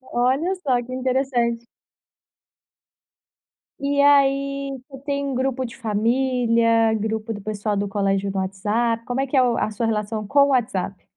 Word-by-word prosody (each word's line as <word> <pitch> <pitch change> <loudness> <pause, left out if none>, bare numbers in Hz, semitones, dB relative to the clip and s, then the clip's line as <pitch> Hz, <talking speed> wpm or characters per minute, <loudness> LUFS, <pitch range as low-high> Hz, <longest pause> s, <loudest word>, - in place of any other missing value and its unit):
Olha 260 +9 0
só, 260 -9 0
que 255 - -10
interessante. 250 -2 0 2.2
E 280 0 +1
aí 275 -1 +2
tu 270 -1 -10
tem 280 -1 -1
um 275 - -2
grupo 260 0 -1
de 235 - -9
família, 230 0 +2
grupo 220 +1 -3
do 205 - -7
pessoal 205 0 -2
do 200 0 -1
colégio 195 0 0
no 195 - -4
WhatsApp, 220 +5 -1
como 250 +2 -1
é 275 - -1
que 270 - 0
é - - +6
o 245 -2 +2
a 215 - -1
sua 230 +3 -2
relação 215 -1 -2
com 280 +6 +2
o - - +3
WhatsApp? 200 -8 -1
240 Hz, 160 wpm, -22 LUFS, 215-270 Hz, 2.2 s, é